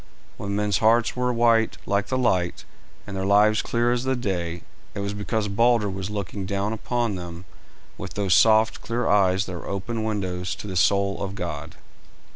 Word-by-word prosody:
When 100 -1 -4
men's 105 -2 +1
hearts 115 +1 +3
were 125 0 0
white 115 -1 +3
like 100 0 0
the 130 - -1
light, 95 -9 0 0.4
and 100 - -7
their 95 - -2
lives 105 +2 +4
clear 120 0 0
as 120 0 0
the 130 0 0
day, 85 -7 -3 0.3
it - - -4
was 100 0 -2
because 105 +1 -2
Balder 115 0 +2
was 95 0 -5
looking 100 -1 -4
down 100 +2 -1
upon 120 0 -1
them 85 0 -8 0.5
with - - -7
those 100 -3 +1
soft, 110 0 +4
clear 120 +1 -2
eyes 95 -1 +3
that 95 - -6
were 85 - -7
open 110 +4 -3
windows 90 -5 -2
to - - -9
the 95 -2 -5
soul 100 +2 +2
of 100 0 -4
God. 85 -4 -5
100 Hz, 185 wpm, -24 LUFS, 95-115 Hz, 0.5 s, lives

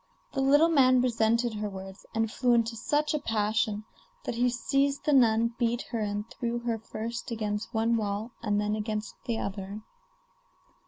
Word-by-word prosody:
The 270 - 0
little 290 +4 +5
man 255 -5 +5
resented 235 -1 +2
her 210 0 -3
words, 190 0 -9
and 225 -1 +1
flew 245 0 +3
into 230 0 +1
such 295 +6 0
a 300 - +1
passion 215 -2 0 0.4
that - - -3
he 245 +2 +2
seized 275 +4 0
the 300 - +3
nun, 230 -3 +4
beat 240 0 +1
her, 230 - -1
and 205 0 -2
threw 235 0 -3
her 235 -2 -1
first 230 +3 -5
against 215 -2 -3
one 225 0 +2
wall 210 +2 -2
and 205 -2 +1
then 210 0 0
against 215 0 -3
the 230 -2 -1
other. 200 +1 -5
230 Hz, 170 wpm, -28 LUFS, 210-245 Hz, 0.4 s, little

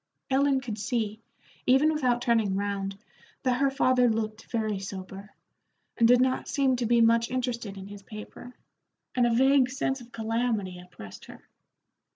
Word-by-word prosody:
Ellen 270 0 +3
could 225 -4 -5
see, 220 -2 -2 0.5
even 275 +5 +4
without 250 -5 +1
turning 225 -5 +2
round, 195 -1 -3 0.5
that 255 -1 +1
her 275 - +4
father 255 -2 +3
looked 220 -1 -3
very 215 -4 -1
sober, 195 +1 -8 0.7
and 230 - +4
did 245 +1 +6
not 260 0 +1
seem 270 -2 +2
to 240 -2 -1
be 235 0 +4
much 230 0 +4
interested 240 -5 -3
in 190 - -8
his 200 0 -10
paper, 215 +4 -10 0.6
and 245 -1 +3
a - - +1
vague 265 +1 +4
sense 265 0 -2
of 240 0 -14
calamity 220 -5 -2
oppressed 140 - -12
her. - - -14
235 Hz, 160 wpm, -27 LUFS, 205-255 Hz, 0.7 s, did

